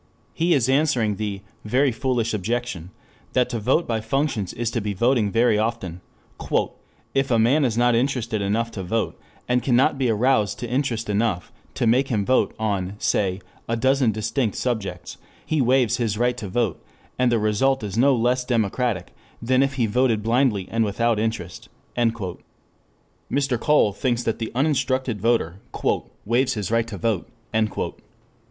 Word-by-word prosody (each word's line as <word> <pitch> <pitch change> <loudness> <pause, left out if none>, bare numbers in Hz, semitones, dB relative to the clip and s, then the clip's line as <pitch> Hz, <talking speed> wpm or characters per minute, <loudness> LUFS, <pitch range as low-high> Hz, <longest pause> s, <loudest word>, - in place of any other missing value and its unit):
He 170 +1 +2
is 130 -4 +2
answering 130 -7 +2
the 105 -3 -3 0.2
"very 130 +5 +2
foolish 120 -2 -1
objection" 105 -4 -3 0.4
that 125 -1 +2
to 115 - -2
vote 130 +10 +2
by 115 -2 -1
functions 110 -4 -1
is 120 -1 -2
to 115 - -1
be 100 -1 -3
voting 120 0 +2
very 115 0 +3
often: 105 -6 -3 1.1
"If 135 0 +1
a 120 - +3
man 125 +7 +4
is 120 -4 0
not 120 0 +4
interested 115 -3 0
enough 110 +4 0
to 100 - -5
vote, 110 +5 -1 0.3
and 125 0 +2
cannot 130 +2 +2
be 130 -3 +2
aroused 110 -2 +2
to 120 +2 -5
interest 120 -2 -1
enough 105 -3 -1 0.2
to - - 0
make 125 +4 +3
him 105 -6 0
vote, 130 - +2
on, 100 -3 -2
say, 95 -2 0 0.3
a 115 - +1
dozen 130 -1 +3
distinct 110 +2 -1
subjects, 100 -8 -3 0.3
he 155 -3 +1
waives 125 -2 +3
his 110 -4 -1
right 120 +1 +1
to 110 - -5
vote 105 -1 -1 0.4
and 125 -1 +3
the 120 - +3
result 110 +5 +1
is 100 -1 -4
no 135 +4 +4
less 125 +2 +1
democratic 115 -4 -1 0.3
than 130 +3 +2
if 135 0 +1
he 125 -3 +1
voted 115 -1 +1
blindly 115 -4 +1
and 115 0 +2
without 110 +2 +1
interest." 105 -6 -4 0.3
Mr. 120 - -4
Cole 150 -9 +3
thinks 120 +2 -1
that 115 - -1
the 115 - -3
uninstructed 130 -5 0
voter 110 -6 +1 0.7
"waives 120 +5 +1
his 105 -1 -3
right 115 0 +2
to 105 -3 -6
vote." 105 -1 -1
115 Hz, 160 wpm, -23 LUFS, 105-130 Hz, 1.1 s, man